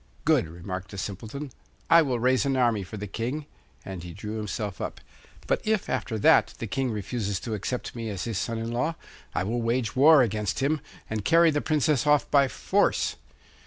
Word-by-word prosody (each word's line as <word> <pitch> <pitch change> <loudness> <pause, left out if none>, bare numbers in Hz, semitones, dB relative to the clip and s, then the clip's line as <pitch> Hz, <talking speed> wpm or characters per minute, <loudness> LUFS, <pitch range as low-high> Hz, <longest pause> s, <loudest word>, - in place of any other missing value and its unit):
'Good!' - - +3
remarked 90 +4 -6
the 100 - -9
Simpleton. 110 +9 -5 0.4
'I 170 - +9
will 130 -6 0
raise 130 +2 +3
an 135 -2 0
army 120 -5 +2
for 95 +3 -7
the 105 - -5
King,' 120 +9 -3 0.4
and 95 -2 -6
he 85 0 -8
drew 105 +3 -5
himself 105 -1 -4
up. - - -4 0.5
'But - - +1
if, 215 -2 0
after 110 - -2
that, 105 - +4
the - - -4
King 135 -1 -1
refuses 105 -2 -2
to 115 - -4
accept 115 +6 -4
me 115 -2 -4
as 95 -3 -4
his 115 -6 -2
son 115 +3 -2
in 115 +1 -3
law, 125 +8 -1 0.4
I - - +1
will 115 +5 -1
wage 115 0 0
war 145 +1 +7
against 105 -3 -1
him, 145 +2 +1 0.3
and 110 -1 -3
carry 165 +3 +5
the 145 -1 0
Princess 150 -3 +1
off 150 -1 +3
by 140 -1 +5
force. 120 - +1
115 Hz, 200 wpm, -27 LUFS, 105-135 Hz, 0.5 s, I